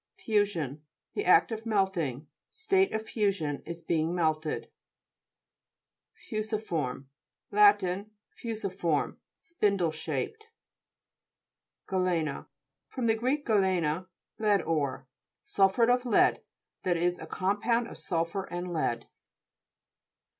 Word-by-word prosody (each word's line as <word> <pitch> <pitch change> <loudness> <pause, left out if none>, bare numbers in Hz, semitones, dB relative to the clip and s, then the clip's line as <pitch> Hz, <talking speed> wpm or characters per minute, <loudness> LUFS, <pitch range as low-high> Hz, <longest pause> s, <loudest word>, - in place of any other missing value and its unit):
FUSION 180 - 0 0.3
The 410 - -2
act 410 - +5
of 225 +1 -5
melting 190 - 0
^ 150 - -26 0.2
state 395 -3 +2
of 220 0 -2
fusion, 195 -10 -1
is 170 0 -6
being 165 +1 0
melted. 155 -2 -1 1.4
FU'SIFORHE' 210 - -3 0.5
Lat 415 - +6 0.5
Fusimorm, 195 -9 -2 0.2
spin 210 -12 0
dle 170 -4 +1
shaped. 430 - -4 1.4
GALE'XA 180 -6 0 0.4
fr. 260 - -6
gr. 230 +1 +1 0.2
galene, 185 -5 +1 0.3
lead 210 -2 +3
ore. 145 -4 -1 0.4
Sulphuret 200 +5 +4
of 250 0 -1
lead, 230 - +4 0.4
that 180 -3 +1
is 175 +1 0
a 160 - -8
com 195 +5 -1
pound 235 0 +2
of - - -10
sulphur 170 +2 -1
and 175 0 -4
lead. 155 -7 -1
190 Hz, 105 wpm, -29 LUFS, 165-220 Hz, 1.4 s, Lat